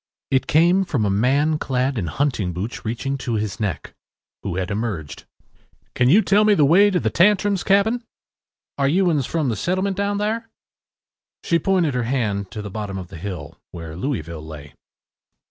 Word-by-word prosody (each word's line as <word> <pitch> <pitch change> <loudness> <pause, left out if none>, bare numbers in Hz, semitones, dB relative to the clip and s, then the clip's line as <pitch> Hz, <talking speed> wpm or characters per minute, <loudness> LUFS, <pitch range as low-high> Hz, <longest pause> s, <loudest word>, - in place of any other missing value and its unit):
It 130 -1 +2
came 175 +5 +4
from 135 - -1
a 100 - +1
man 140 +9 +2
clad 130 +1 -1
in 95 -7 -2
hunting 105 - -1
boots 100 +8 -5
reaching 135 +5 -3
to 120 -3 -2
his 105 -2 -3
neck, 100 -5 -3 0.5
who 90 - -4
had 95 +2 -2
emerged. 100 -8 -4 0.7
“Can 125 0 +2
you 205 +9 +6
tell 205 +1 +4
me 210 -1 +4
the 150 - +4
way 190 +8 +6
to 185 -3 +1
the - - -1
Tantrums’ 205 +1 +3
cabin?” 220 +5 +2 0.8
“Are 140 - +3
you 180 +4 +3
uns 145 -5 0
from 155 -5 -1
the 115 - -1
settlements 185 - -1
down 200 0 0
thar?” 225 +2 -2 0.9
She 170 - +2
pointed 175 -4 +1
her 125 - 0
hand 105 -7 -1
down - - -29
to 105 - -6
the 100 - -7
bottom 100 -2 -5
of 90 -2 -7
the 85 - -9
hill, 90 -3 -7
where 80 -2 -8
Louisville 85 - -4
lay. 75 -2 -10
130 Hz, 185 wpm, -22 LUFS, -, 0.9 s, you